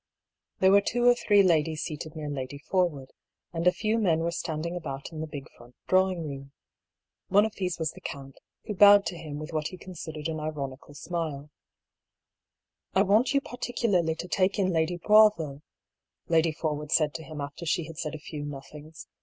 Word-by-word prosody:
There 190 Hz, 0 st, +6 dB
were 200 Hz, +1 st, +7 dB
two 240 Hz, +4 st, 0 dB
or 245 Hz, -, +8 dB
three 205 Hz, -4 st, +4 dB
ladies 160 Hz, -3 st, +2 dB
seated 155 Hz, 0 st, -6 dB
near 155 Hz, -1 st, -5 dB
Lady 140 Hz, -1 st, -5 dB
Forwood, 150 Hz, -4 st, -1 dB, 0.4 s
and 170 Hz, +1 st, 0 dB
a -, -, +8 dB
few 220 Hz, +4 st, 0 dB
men 165 Hz, -7 st, +2 dB
were 170 Hz, +1 st, 0 dB
standing 165 Hz, 0 st, -3 dB
about 140 Hz, -4 st, -6 dB
in 155 Hz, -1 st, -6 dB
the 160 Hz, -, -4 dB
big 145 Hz, -3 st, -8 dB
front 120 Hz, +1 st, -17 dB
drawing 185 Hz, -3 st, +2 dB
room. 140 Hz, -1 st, -8 dB, 0.7 s
One 205 Hz, +3 st, +5 dB
of 220 Hz, -, -4 dB
these 180 Hz, -3 st, -3 dB
was 160 Hz, -2 st, -1 dB
the -, -, -14 dB
count, 135 Hz, -1 st, -8 dB, 0.3 s
who 210 Hz, -, -3 dB
bowed 205 Hz, 0 st, +7 dB
to 180 Hz, -, -3 dB
him 155 Hz, -3 st, -7 dB
with 155 Hz, +2 st, -7 dB
what 155 Hz, -1 st, -1 dB
he 185 Hz, -, -9 dB
considered 160 Hz, -4 st, -7 dB
an 160 Hz, -1 st, -3 dB
ironical 145 Hz, -2 st, -6 dB
smile. 150 Hz, -3 st, -4 dB, 0.7 s
" -, -, -59 dB
I 190 Hz, -, +5 dB
want 220 Hz, +8 st, +3 dB
you 275 Hz, -, +4 dB
particularly 225 Hz, -10 st, -1 dB
to 175 Hz, -, -6 dB
take 190 Hz, +2 st, +1 dB
in 185 Hz, -2 st, +1 dB
Lady 165 Hz, +2 st, +1 dB
Boisville," 175 Hz, -8 st, +4 dB, 0.7 s
Lady 165 Hz, 0 st, +3 dB
Forwood 150 Hz, -1 st, -3 dB
said 150 Hz, -2 st, +3 dB
to 160 Hz, -, -6 dB
him 155 Hz, -1 st, -8 dB
after 145 Hz, +4 st, -6 dB
she 170 Hz, -, +1 dB
had 160 Hz, 0 st, -9 dB
said 155 Hz, -1 st, -3 dB
a -, -, -7 dB
few 150 Hz, 0 st, -7 dB
nothings. 150 Hz, +2 st, -9 dB
160 Hz, 195 wpm, -28 LUFS, 150-185 Hz, 0.7 s, or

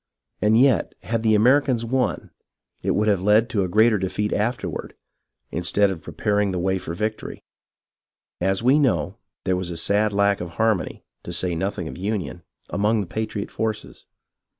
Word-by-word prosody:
And 110 Hz, +2 st, +4 dB
yet 135 Hz, -1 st, +3 dB
had 115 Hz, -1 st, -1 dB
the 110 Hz, -1 st, +3 dB
Americans 125 Hz, +1 st, +3 dB
won, 125 Hz, +2 st, -1 dB, 0.5 s
it -, -, 0 dB
would 105 Hz, +1 st, +1 dB
have 100 Hz, -4 st, +2 dB
led 105 Hz, +4 st, +3 dB
to 100 Hz, -3 st, +1 dB
a -, -, -1 dB
greater 110 Hz, +3 st, +4 dB
defeat 105 Hz, +3 st, -2 dB
afterward, 115 Hz, +4 st, -3 dB, 0.6 s
instead 95 Hz, +4 st, +2 dB
of 85 Hz, -4 st, -6 dB
preparing 105 Hz, +2 st, -1 dB
the 90 Hz, -, -2 dB
way 95 Hz, +1 st, 0 dB
for 85 Hz, -1 st, -6 dB
victory. 110 Hz, +3 st, -4 dB, 1.0 s
As 95 Hz, +3 st, 0 dB
we 135 Hz, +5 st, +5 dB
know, 135 Hz, -6 st, 0 dB, 0.2 s
there 95 Hz, -, +1 dB
was 90 Hz, -1 st, -3 dB
a 85 Hz, -, -4 dB
sad 105 Hz, +5 st, +2 dB
lack 100 Hz, -1 st, +2 dB
of 85 Hz, -1 st, -7 dB
harmony, 110 Hz, -4 st, 0 dB, 0.2 s
to -, -, -8 dB
say 90 Hz, -2 st, 0 dB
nothing 90 Hz, +1 st, -3 dB
of 85 Hz, -, -8 dB
union, 95 Hz, -3 st, -3 dB, 0.3 s
among 105 Hz, +2 st, +1 dB
the -, -, -4 dB
patriot 110 Hz, +2 st, -4 dB
forces. 110 Hz, -1 st, -4 dB
105 Hz, 170 wpm, -23 LUFS, 95-110 Hz, 1.0 s, we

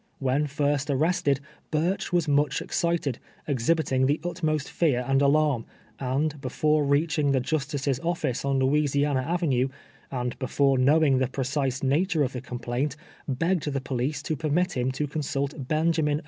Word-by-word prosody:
When 135 Hz, +2 st, 0 dB
first 145 Hz, 0 st, 0 dB
arrested, 145 Hz, 0 st, +1 dB, 0.3 s
Burch 175 Hz, +5 st, -1 dB
was 175 Hz, -2 st, +1 dB
much 145 Hz, 0 st, +2 dB
excited, 170 Hz, -8 st, -1 dB, 0.3 s
exliiliiting 135 Hz, -1 st, +1 dB
the 145 Hz, +3 st, +1 dB
utmost 160 Hz, -4 st, -1 dB
fear 130 Hz, -7 st, +1 dB
and 135 Hz, 0 st, +3 dB
alarm, 145 Hz, -4 st, +2 dB, 0.3 s
and 140 Hz, +3 st, -1 dB
be 130 Hz, -, -4 dB
fore 155 Hz, +3 st, +2 dB
reaching 145 Hz, 0 st, +2 dB
the 135 Hz, -, +3 dB
justice's 140 Hz, -1 st, -1 dB
office 165 Hz, -7 st, -2 dB
on 140 Hz, -1 st, +1 dB
Louisiana 140 Hz, 0 st, +2 dB
Ave 175 Hz, +1 st, 0 dB
nue, 130 Hz, -2 st, +2 dB, 0.4 s
and 125 Hz, -2 st, -3 dB
before 135 Hz, +1 st, +2 dB
knowing 140 Hz, 0 st, +4 dB
tlie 130 Hz, -1 st, 0 dB
precise 135 Hz, 0 st, -1 dB
nature 155 Hz, +4 st, +2 dB
of 130 Hz, -, -2 dB
the 125 Hz, -, -4 dB
complaint, 125 Hz, +3 st, -3 dB, 0.3 s
begged 155 Hz, +3 st, 0 dB
the 135 Hz, -, -1 dB
police 135 Hz, +3 st, -2 dB
to 155 Hz, -, -1 dB
permit 160 Hz, +5 st, 0 dB
him 125 Hz, +1 st, 0 dB
to 150 Hz, +3 st, -1 dB
consult 140 Hz, -1 st, -3 dB
Benjamin 155 Hz, -1 st, +1 dB
145 Hz, 155 wpm, -26 LUFS, 135-155 Hz, 0.4 s, knowing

